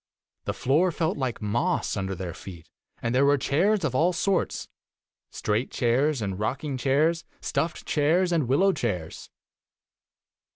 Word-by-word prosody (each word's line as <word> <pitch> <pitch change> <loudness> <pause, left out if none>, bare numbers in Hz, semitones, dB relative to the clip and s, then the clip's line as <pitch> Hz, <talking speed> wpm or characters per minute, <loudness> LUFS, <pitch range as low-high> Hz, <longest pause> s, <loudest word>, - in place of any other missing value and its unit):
The - - -1
floor 160 +8 +2
felt 160 0 -1
like 130 -5 -3
moss 120 - 0
under 95 -1 -2
their 90 -2 -5
feet, 85 -3 -11 0.4
and 115 0 0
there 130 +2 +4
were 145 +1 +4
chairs 185 +10 +1
of 145 -5 0
all 165 +7 +3
sorts 190 +2 0 0.3
— - - -68 0.3
straight 110 +4 -1
io - - -6
chairs 130 +2 +2
and 95 -1 -3
rocking 135 +6 -2
chairs, 145 +6 +2 0.2
stuffed 165 0 -2
chairs 165 +5 +2
and 160 -7 +1
wil 135 +8 +2
low 195 0 +4
chairs. 90 - -4
135 Hz, 160 wpm, -26 LUFS, 115-165 Hz, 0.4 s, there